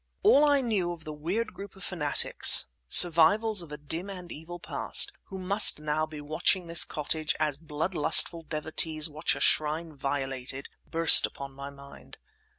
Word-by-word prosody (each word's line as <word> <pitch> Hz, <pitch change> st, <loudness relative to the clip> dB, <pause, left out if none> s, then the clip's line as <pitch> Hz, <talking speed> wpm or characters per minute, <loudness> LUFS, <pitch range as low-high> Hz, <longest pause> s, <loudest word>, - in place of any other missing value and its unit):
All 390 Hz, -8 st, +4 dB
that -, -, +2 dB
I 285 Hz, -1 st, +2 dB
knew 205 Hz, -8 st, -2 dB
of 165 Hz, -2 st, -14 dB
the 155 Hz, -1 st, -8 dB
weird 180 Hz, +10 st, -5 dB
group 200 Hz, 0 st, -11 dB
of 190 Hz, -, -13 dB
fanatics—survivals 170 Hz, -, +2 dB
of 165 Hz, -3 st, -11 dB
a 150 Hz, -, -8 dB
dim 160 Hz, +6 st, -5 dB
and 180 Hz, -3 st, -10 dB
evil 160 Hz, +3 st, -9 dB
past—who 395 Hz, -, -2 dB
must 195 Hz, +3 st, +4 dB
now 155 Hz, +1 st, -3 dB
be 155 Hz, -1 st, -11 dB
watching 155 Hz, +5 st, -2 dB
this 170 Hz, 0 st, +4 dB
cottage 155 Hz, +1 st, -4 dB
as 150 Hz, -3 st, -2 dB
bloodlustful 160 Hz, +1 st, +1 dB
devotees 155 Hz, 0 st, +1 dB
watch 155 Hz, +1 st, -3 dB
a -, -, -8 dB
shrine 155 Hz, +1 st, 0 dB
violated, 135 Hz, -1 st, -4 dB, 0.2 s
burst 165 Hz, 0 st, +6 dB
upon 140 Hz, -1 st, -11 dB
my 140 Hz, +1 st, -9 dB
mind. 140 Hz, 0 st, -15 dB
160 Hz, 155 wpm, -26 LUFS, 150-180 Hz, 0.2 s, burst